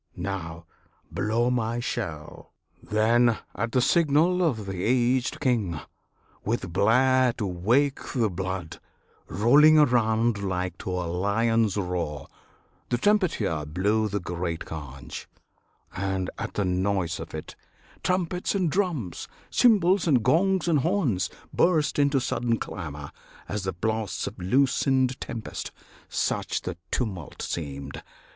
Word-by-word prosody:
Now, 85 -3 -5 0.5
blow 115 +4 +1
my 115 -1 0
shell!" 80 -10 -5 0.3
Then, 115 +2 +3 0.2
at 115 +4 -2
the 125 - +2
signal 170 +5 +3
of 125 - 0
the 95 -2 -4
aged 125 +1 +1
king, 110 - 0 0.6
With 105 -6 -2
blare 130 +4 +4
to 115 -3 -3
wake 115 +11 +1
the 115 -6 +1
blood, 95 -2 -4 0.5
rolling 145 +10 +6
around 115 -5 +3
Like 90 -2 -2
to - - -5
a 90 -1 -2
lion's 105 +4 +1
roar, 85 -7 -2 0.6
the 120 - +1
trumpeter 185 - +1
Blew 105 +7 +1
the 100 0 -1
great 85 -2 -4
Conch; 70 -4 -8 0.7
and, 95 -1 -2
at - - -5
the 105 - 0
noise 90 -1 0
of - - -7
it, - - -7 0.5
Trumpets 180 0 -1
and 180 -5 +1
drums, 165 - -2 0.2
cymbals 195 -6 +4
and 130 -8 +3
gongs 190 - +2
and 160 -4 +3
horns 150 - +1 0.2
Burst 160 -5 +2
into 140 -1 +3
sudden 120 -2 0
clamour; 75 -8 -6 0.4
as 100 -2 -3
the 95 - -1
blasts 110 +1 -2
Of 100 - -7
loosened 130 +5 +2
tempest, 115 - -5 0.4
such - - -1
the 90 - -4
tumult 95 - -3
seemed! 70 -3 -5
110 Hz, 125 wpm, -26 LUFS, 90-130 Hz, 0.7 s, rolling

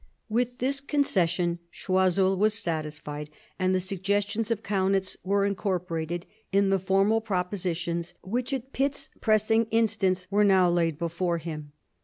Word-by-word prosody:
With 245 +2 0
this 275 +2 0
concession 180 - +1
Choiseul 190 +1 +2
was 210 +2 +2
satisfied, 155 -6 -4 0.3
and 185 0 +2
the - - +2
suggestions 200 +4 -1
of 225 -2 -1
Kaunitz 195 -1 0
were 200 +1 +2
in 200 - +1
corporated 175 -3 -2 0.3
in 195 0 +3
the 195 - +3
formal 195 +4 +2
propositions 180 -4 -2
which 245 +7 -2
at 265 -1 -4
Pitt's 280 +1 -1
pressing 220 +1 +3
instance 215 -5 +1
were 205 +1 +4
now 190 -3 +5
laid 165 -3 +1
before 170 +1 -1
him. 155 -3 -7
190 Hz, 140 wpm, -27 LUFS, 175-215 Hz, 0.3 s, now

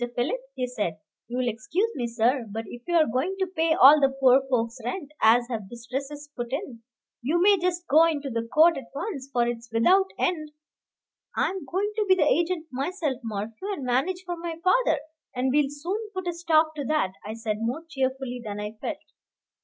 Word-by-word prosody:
Philip," 310 - -1
he 255 - -1
said, 205 -10 -3 0.3
"you'll 245 +1 -1
excuse 315 - -1
me, 240 -2 -2
sir, 235 +1 +1
but 225 +2 -5
if 240 - -9
you're 340 -3 +4
going 265 +11 -1
to 380 - +1
pay 330 -3 +1
all 290 +2 +8
the 275 - +5
poor 270 -1 +4
folks' 235 -1 0
rent 285 +5 -4
as 235 +2 +5
have 220 -6 -5
distresses 270 +5 -6
put 240 -1 -5
in, 265 - -4 0.4
you 300 +8 +1
may 400 +3 +6
just 350 0 -1
go 320 +1 +6
into 290 -4 -1
the 230 -1 -1
court 325 +1 +5
at 270 - -6
once, 285 -6 -4
for 240 -2 +2
it's 235 0 -4
without 365 +13 +4
end 310 -4 -1 0.4
" - - -28
"I - - +2
am 380 -5 -6
going 390 +9 -1
to 425 - +2
be 375 - +7
the 370 - +2
agent 340 -1 +1
myself, 280 0 -2
Morphew, 225 - -4
and 290 - -6
manage 315 +10 0
for 350 -1 -3
my 335 -1 -4
father; 365 - +3 0.3
and 255 +1 +1
we'll 295 -1 +3
soon 335 +9 -3 0.2
put 375 -1 -3
a 350 - 0
stop 320 -2 +2
to 285 - -3
that," 305 -10 +1
I 215 +2 -6
said, 220 -2 -2
more 245 +8 -2
cheerfully 260 -3 -2
than 210 -2 -5
I 210 0 -4
felt. - - -3
275 Hz, 200 wpm, -26 LUFS, 240-340 Hz, 0.4 s, all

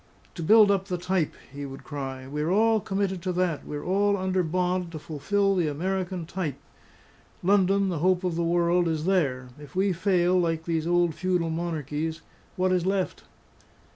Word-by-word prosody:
"To 170 - -7
build 210 +4 +6
up 195 -1 +1
the 180 -2 -2
type!" 180 -2 -1 0.2
he 145 0 -6
would 135 -1 -8
cry. 135 -3 -6
"We're 150 +3 -2
all 220 +3 +4
committed 195 -2 -2
to 185 0 -2
that; 175 -4 -1
we're 145 0 -5
all 200 +2 +2
under 185 0 0
bond 180 +1 -1
to - - -4
fulfil 195 +7 0
the 175 -4 +1
American 180 +3 -2
Type! 170 -4 -3 0.9
Loudon, 195 +1 +3
the 170 -4 -2
hope 185 +2 +2
of 180 -2 -1
the 170 - 0
world 175 +1 +2
is 160 -1 -1
there. 140 -10 +1
If 145 0 -13
we 190 0 +2
fail, 180 0 +2
like 165 -2 -1
these 165 -1 -1
old 175 -1 +2
feudal 180 -1 0
monarchies, 160 -1 -3 0.3
what 185 0 +1
is 180 -2 +2
left?" 190 -1 -1
175 Hz, 175 wpm, -26 LUFS, 160-190 Hz, 0.9 s, build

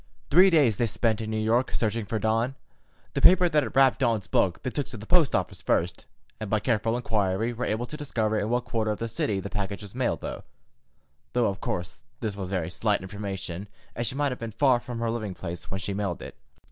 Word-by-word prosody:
Three 185 +5 +8
days 140 - +4
they 120 - +2
spent 110 0 0
in 110 - -4
New 110 - -1
York, 115 +4 +1
searching 110 -1 0
for 110 - -2
Dawn. 115 +5 +1 0.6
The - - -1
paper 180 0 +7
that 155 -3 +3
had 135 - -5
wrapped 135 -1 +5
Dan's 115 -6 +1
book 90 -3 +1
they 130 - -2
took 145 +1 -2
to 115 - -8
the 105 - -9
post 170 0 +4
office 90 -2 -2
first, 85 +1 0 0.3
and 110 - -5
by 110 - +2
careful 115 +1 +1
inquiry 110 -1 0
were 120 +2 -3
able 110 +3 -1
to 150 - -7
discover 110 -7 0
in 105 - -1
what 125 +1 0
quarter 115 -3 -1
of 105 - -1
the 115 - -3
city 105 -3 -1
the 100 +1 -6
package 100 -1 -3
was 100 - -10
mailed, 125 -1 -1
though, - - -5 0.9
of 100 -6 +1
course, 90 0 -4 0.2
this 105 -3 -3
was 95 -2 -5
very 90 -4 -2
slight 105 0 0
information, 95 -1 -5 0.3
as 120 0 -1
she 125 - -2
might 145 -1 +1
have 125 - -5
been 115 - -4
far 130 -2 +4
from 120 0 -7
her 115 0 0
living 110 -5 -3
place 85 -1 -6
when 95 - -3
she 100 +2 -3
mailed 100 -3 -2
it. - - -8
110 Hz, 230 wpm, -27 LUFS, 100-125 Hz, 0.9 s, Three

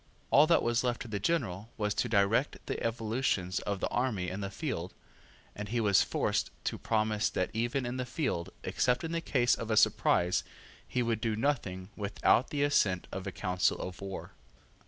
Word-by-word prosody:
All 145 +3 +7
that 170 - +4
was 120 +1 +1
left 120 -1 -1
to - - -10
the 105 -2 -3
general 105 - -1
was 105 -1 0
to 120 - -1
direct 110 +6 +2
the - - -3
evolutions 110 -5 0
of 100 -2 -3
the - - +1
army 110 -8 0
in 95 +2 -4
the 100 - -3
field, 95 - -4 0.6
and 105 0 -6
he 120 +2 0
was 100 -3 +4
forced - - 0
to - - -2
promise 110 -1 +1
that 90 - -1
even 120 +4 -1
in 120 +1 -3
the 125 - -2
field, 120 - -2
except 125 -1 +1
in 165 - -3
the 165 0 -1
case 125 -6 +2
of 115 - -3
a 110 - +2
surprise, 90 -2 +3 0.4
he 125 - 0
would 115 -2 -1
do 115 -3 0
nothing 100 -8 -1
without 105 +4 +2
the 145 -1 0
assent 100 -11 +2
of 95 +1 -5
a - - -2
council 90 -1 0
of 90 - -6
war. 95 -1 -6
110 Hz, 195 wpm, -31 LUFS, 100-125 Hz, 0.6 s, All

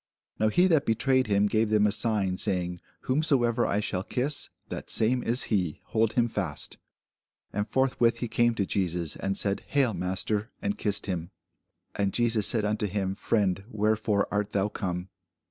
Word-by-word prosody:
Now 110 - +3
he 175 - +3
that 160 -6 +2
betrayed 130 +3 +2
him 100 0 +3
gave 110 +1 +1
them 105 -1 +3
a 105 - +3
sign, 100 -3 +1
saying, 90 -3 -2 0.2
Whomsoever 130 -4 +2
I 100 - 0
shall 95 -3 -2
kiss, 130 +8 +1 0.2
that - - -6
same 125 +3 +3
is 120 +2 +1
he: 90 -7 0
hold 110 0 +1
him 120 -1 +2
fast. 95 -10 -2 0.8
And 105 +1 -2
forthwith 130 -3 +2
he 120 - -3
came 120 +1 +2
to 100 - 0
Jesus, 90 -5 -2
and 95 0 -2
said, 100 -1 0
Hail, 135 -5 +2
master; 100 +4 -1
and 100 0 -2
kissed 105 -1 0
him. 85 -3 -3 0.6
And 100 -2 -1
Jesus 115 -3 +2
said 110 -4 +1
unto 105 0 0
him, 95 -1 -2
Friend, 100 -2 0
wherefore 105 -2 +1
art 105 0 -1
thou 100 +1 +1
come? 90 -3 -4
105 Hz, 170 wpm, -27 LUFS, 95-115 Hz, 0.8 s, Now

